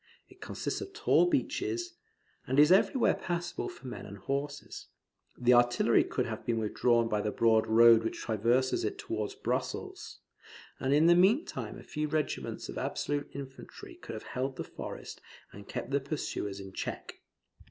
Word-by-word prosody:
It - - -19
consists - - -4
of 395 -1 -7
tall 355 - +3
beeches, 350 +4 -1 0.5
and 130 +2 +2
is 150 +3 +7
everywhere 220 +6 +4
passable 175 0 -3
for 175 -6 -13
men 125 - -7
and 100 0 -9
horses. 140 +8 -4 0.5
The 125 0 +4
artillery 120 0 +4
could - - -2
have - - -5
been 115 -1 -1
withdrawn 115 +2 +2
by 105 -2 0
the 105 - -1
broad 110 +1 +3
road 115 0 +7
which 115 - -3
traverses 120 - +1
it 400 0 -2
towards 410 -1 -4
Brussels; 400 -2 -4 0.6
and 135 - -1
in 150 +3 +5
the 170 - +7
meanwhile 200 - +2
a - - -11
few 150 0 -3
regiments 150 0 -2
of - - -7
resolute 145 0 -2
infantry 140 - -9
could 345 - -9
have 110 - -7
held 130 +1 -2
the - - -4
forest - - -8 0.3
and 100 0 -12
kept 130 - -5
the 140 - +2
pursuers 135 -8 -4
in 95 -1 -9
check. - - -6
140 Hz, 165 wpm, -30 LUFS, 115-190 Hz, 0.6 s, is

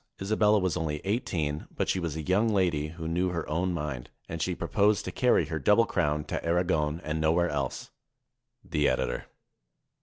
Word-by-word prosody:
Isabella 105 +1 +3
was 95 -4 0
only 75 -2 -2
eighteen, 85 -8 -2
but - - -1
she 95 - +1
was 85 -4 -3
a 80 - -4
young 100 +7 +2
lady 90 -8 +1
who 80 +1 -7
knew 90 +3 +1
her 85 -2 -3
own 90 +4 0
mind, 75 -7 -4 0.2
and 80 0 -5
she 90 +2 0
proposed 105 +1 +1
to - - -3
carry - - +3
her - - -3
double - - +4
crown 75 0 0
to - - -4
Aragon 85 -3 +1
and 80 0 -2
nowhere 85 +3 +3
else. 70 -3 -3 0.7
The 75 -1 +1
Editor. - - -1
85 Hz, 180 wpm, -28 LUFS, 75-95 Hz, 0.7 s, double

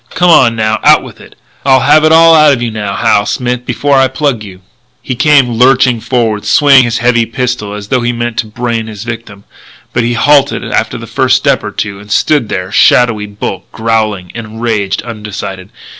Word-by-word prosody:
Come 180 0 +1
on, 120 -7 +4
now, 110 -1 -1
out - - +5
with - - -13
it! - - -16 0.3
I'll 130 -1 +3
have 150 +3 +4
it 155 - +3
all 165 0 +6
out 155 -2 +5
of 130 - -2
you 120 -1 -3
now, 105 -2 -4
Hal 105 +1 +1
Smith, 125 0 -3
before 140 +3 0
I 135 0 +4
plug 130 -4 -2
you 95 -2 -12 0.2
" 125 +1 -43
He 130 - -3
came 140 -1 +3
lurching 125 0 +2
forward, 115 -4 -1
swinging 140 -3 +4
his 120 -1 -2
heavy 120 -1 +1
pistol 120 -4 -4
as 105 0 -9
though 130 -2 0
he 120 0 -1
meant 120 -1 -4
to 110 - -2
brain 115 0 -4
his 110 -1 -8
victim, 115 -4 -8 0.5
but 120 - 0
he 120 +1 -1
halted 140 +4 +2
after - - -2
the - - -9
first - - +1
step - - 0
or - - -4
two 100 -1 -5
and 105 +1 -13
stood 145 0 +1
there, 95 0 -4
a - - -12
shadowy 110 -4 +3
bulk, 100 0 -7
growling, 110 -5 -2
enraged, 110 -3 -3
undecided. 105 -4 -7
120 Hz, 205 wpm, -11 LUFS, 105-130 Hz, 0.5 s, all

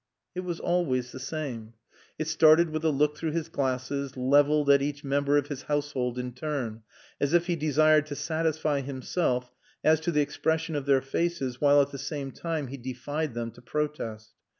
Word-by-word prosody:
It 180 - -4
was 180 -2 -4
always 130 -9 0
the - - -8
same. 130 -6 -5 0.4
It 155 - -3
started 155 +1 +5
with 155 0 -3
a 160 - +3
look 150 +1 +2
through 160 0 -3
his 165 -1 -2
glasses, 135 -1 -2
leveled 145 +3 +4
at 140 -1 +5
each 145 0 -3
member 140 +1 +2
of 145 - +1
his 145 -2 -6
household 140 -5 -2
in 125 0 -4
turn, 130 -5 -4 0.4
as 145 +2 0
if 175 0 +4
he 175 -1 0
desired 155 0 +3
to 145 - -5
satisfy 155 -2 0
himself 130 -1 -2 0.3
as 155 0 +5
to 160 +2 -1
the 150 -2 +3
expression 160 +2 -1
of 140 -1 -3
their 135 -1 +4
faces 135 -3 -2
while 145 0 +6
at 140 - -7
the 140 - -7
same 135 0 -4
time 160 0 -3
he 140 - -6
defied 130 +3 -4
them 115 -1 -3
to - - -16
protest. 120 -6 -4
145 Hz, 190 wpm, -28 LUFS, 130-155 Hz, 0.4 s, while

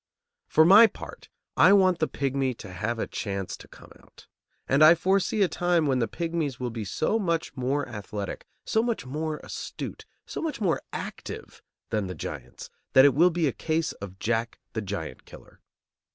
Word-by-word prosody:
For 160 - +5
my 205 +6 +9
part, 215 - -11 0.3
I - - +7
want 185 -3 +4
the 155 - +1
pigmy 135 -1 -1
to 95 -3 -10
have 110 +6 -2
a - - -1
chance 100 -3 -4
to - - -14
come - - -16
out. - - -19 0.4
And 140 +3 +4
I 160 +2 +9
foresee 195 +4 +2
a - - +3
time 175 -2 +1
when 135 -3 +1
the 115 - +1
pigmies 165 -2 -3
will 125 -1 -3
be 110 -2 -5
so 155 - 0
much 170 -5 -1
more 135 +2 -1
athletic, 105 -3 -6 0.2
so 220 - +2
much 235 - -2
more 155 +3 -3
astute, - - -7 0.2
so - - -6
much 320 -5 -3
more 185 -7 +1
active, - - -7 0.3
than 105 -3 0
the 90 - -6
giants, - - -8 0.2
that 130 +1 +8
it 140 - +6
will 170 +7 +5
be 170 -1 0
a 135 - +1
case 160 0 -1
of 95 -1 -9
Jack 115 +2 -1 0.2
the 110 - -2
giant 95 -7 -6
killer. - - -15
140 Hz, 185 wpm, -27 LUFS, 115-170 Hz, 0.4 s, my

